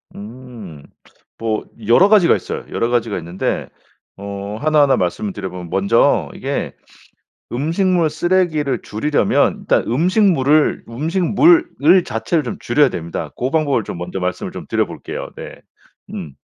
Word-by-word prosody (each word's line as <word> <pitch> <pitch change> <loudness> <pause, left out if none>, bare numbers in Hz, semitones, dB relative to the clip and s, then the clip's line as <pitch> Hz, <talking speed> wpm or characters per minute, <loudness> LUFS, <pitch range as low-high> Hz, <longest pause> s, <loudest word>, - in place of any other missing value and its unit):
음. 110 - -10 0.5
뭐 110 -1 -2 0.2
여러 180 +12 +5
가지가 205 -6 +5
있어요. - - -5
여러 115 - -1
가지가 115 -4 0
있는데 85 +2 -3 0.5
어 100 +1 -6
하나하나 150 -2 +4
말씀을 95 +2 -2
드려 95 -2 -5
보면 90 -2 -8
먼저 100 +6 +2
이게 - - -3 0.8
음식물 165 +5 +1
쓰레기를 155 -5 0
줄이려면 145 +8 +1
일단 - - +1
음식물을, 155 - +2
음식물을 180 - +3
자체를 115 +9 -1
좀 120 - -5
줄여야 140 +3 +3
됩니다. 85 -5 -5
고 125 - -2
방법을 145 -7 +1
좀 - - -7
먼저 90 +2 -5
말씀을 90 0 -3
좀 - - -8
드려볼게요. - - -3
네. - - -9 0.5
음. 75 - -7
125 Hz, 300 characters per minute, -18 LUFS, 100-160 Hz, 0.8 s, 여러